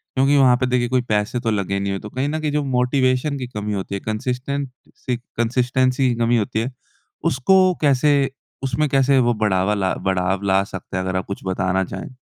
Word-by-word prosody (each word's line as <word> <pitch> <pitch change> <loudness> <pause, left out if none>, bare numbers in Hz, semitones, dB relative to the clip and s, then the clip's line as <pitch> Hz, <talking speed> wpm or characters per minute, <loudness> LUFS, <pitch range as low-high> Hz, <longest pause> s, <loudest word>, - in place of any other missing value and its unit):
क्योंकि 135 +2 +3
वहाँ 130 -2 +6
पे 130 - 0
देखिए 125 -1 +1
कोई 130 -1 +2
पैसे 105 +3 0
तो 115 -2 -1
लगे 100 -1 -1
नहीं 100 0 -2
है 95 - -3
तो 105 - -9
कहीं 130 +5 -2
न 155 +1 -2
कहीं 150 -1 -1
जो 150 0 0
मोटिवेशन 130 +2 +1
की 125 - -5
कमी 105 -3 -4
होती 100 0 -3
है - - -3
कंसिस्टेंट 125 +5 -2 0.3
सी 125 -2 -3 0.2
कंसिस्टेंसी 125 +2 +1
की 120 - 0
कमी 120 0 +2
होती 110 0 -1
है। 125 +4 -2 0.6
उसको 185 +7 +4
कैसे 145 0 +3 0.5
उसमें 135 +3 0
कैसे 135 0 +3
वो 120 -1 +3
बढ़ावा 105 -2 +1
ला 95 -2 0 0.2
बढ़ाव 95 +1 0
ला 95 0 +3
सकते 95 -1 -7
है 95 - -1
अगर 95 0 -3
आप 95 - -1
कुछ 100 - -5
बताना 95 0 0
चाहें? 130 - -7
125 Hz, 210 wpm, -21 LUFS, 100-135 Hz, 0.6 s, वहाँ